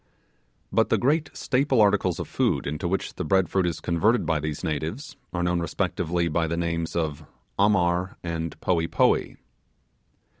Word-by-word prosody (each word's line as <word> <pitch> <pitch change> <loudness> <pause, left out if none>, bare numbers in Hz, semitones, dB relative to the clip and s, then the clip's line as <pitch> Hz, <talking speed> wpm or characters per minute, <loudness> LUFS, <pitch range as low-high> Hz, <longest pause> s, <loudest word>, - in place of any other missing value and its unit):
But - - +2
the - - +3
great 145 +3 +1
staple 135 -1 +1
articles 100 -4 +3
of - - -4
food - - 0
into 75 +4 -3
which 95 +3 -2
the - - -4
bread 95 -4 +2
fruit 95 -2 +1
is 85 - -2
converted 95 +5 +1
by 80 -1 +1
these 75 0 -4
natives 80 - -3 0.2
are 90 -1 -2
known 90 0 +1
respectively 85 +1 -1
by 80 +1 0
the 85 +1 -2
names 85 -1 -2
of 80 -2 -2 0.4
Amar 95 0 +2
and 85 -2 -4
Poee 85 -2 +1
Poee. - - +2
85 Hz, 160 wpm, -25 LUFS, 80-95 Hz, 0.4 s, the